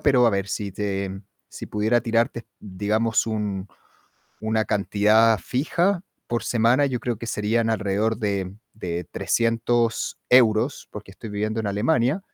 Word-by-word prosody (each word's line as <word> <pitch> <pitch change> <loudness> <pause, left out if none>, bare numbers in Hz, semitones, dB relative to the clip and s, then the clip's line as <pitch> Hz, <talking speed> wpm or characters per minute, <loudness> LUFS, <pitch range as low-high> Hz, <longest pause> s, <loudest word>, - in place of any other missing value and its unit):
pero 125 -4 +4
a - - +5
ver, 100 -1 -1
si 100 0 -3
te 100 -1 -2 0.4
si - - -8
pudiera 110 +3 +1
tirarte, 115 0 0
digamos, 105 +4 0
un 105 -3 -3 0.8
una 110 0 +1
cantidad 105 +2 +3
fija 170 - 0 0.3
por 120 0 -1
semana, 120 +4 +3
yo 125 -3 -2
creo 120 -3 -2
que 115 - -7
serían 115 +1 0
alrededor 110 +1 0
de 100 -3 -2 0.2
de 90 -4 -4
300 115 0 0
euros, 120 +1 +4
porque 105 -2 -9
estoy 110 +2 -9
viviendo 110 +2 -2
en 110 - -3
Alemania 125 - +1
110 Hz, 140 wpm, -24 LUFS, 105-120 Hz, 0.8 s, a